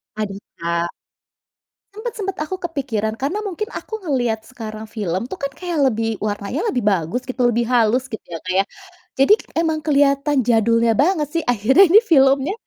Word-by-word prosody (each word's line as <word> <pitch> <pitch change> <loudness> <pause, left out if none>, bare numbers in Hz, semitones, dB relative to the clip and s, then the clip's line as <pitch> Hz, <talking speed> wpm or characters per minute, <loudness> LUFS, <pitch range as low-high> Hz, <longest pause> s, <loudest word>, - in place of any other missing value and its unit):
Aduh 205 -2 -4 0.2
Kak. 170 0 -1 1.0
Sempat 440 +3 -5
sempat 390 -2 -3
aku 375 +5 -4
kepikiran 255 - -2
karena 280 - -2
mungkin 415 +3 -4
aku 440 -2 -7
ngelihat 245 -8 -1
sekarang 220 -3 -8
film 190 -2 -2
tuh 380 - -6
kan 280 0 -3
kayak 350 -3 -3
lebih 225 -2 -1
warnanya 210 - -2
lebih 250 - -1
bagus 195 +4 0
gitu 255 -1 0
lebih 235 +1 +1
halus 245 +2 +2
gitu 220 - -6
ya 165 -1 -6
Kak 185 - -3
ya. - - +4 0.6
Jadi 275 +10 +6 0.2
emang 320 -1 +1
kelihatan 285 -1 +2
jadulnya 230 0 +3
banget 300 - +2
sih 330 -1 0
akhirnya 245 - +5
ini 405 +5 +8
filmnya 275 - +4
255 Hz, 165 wpm, -20 LUFS, 220-315 Hz, 1.0 s, ini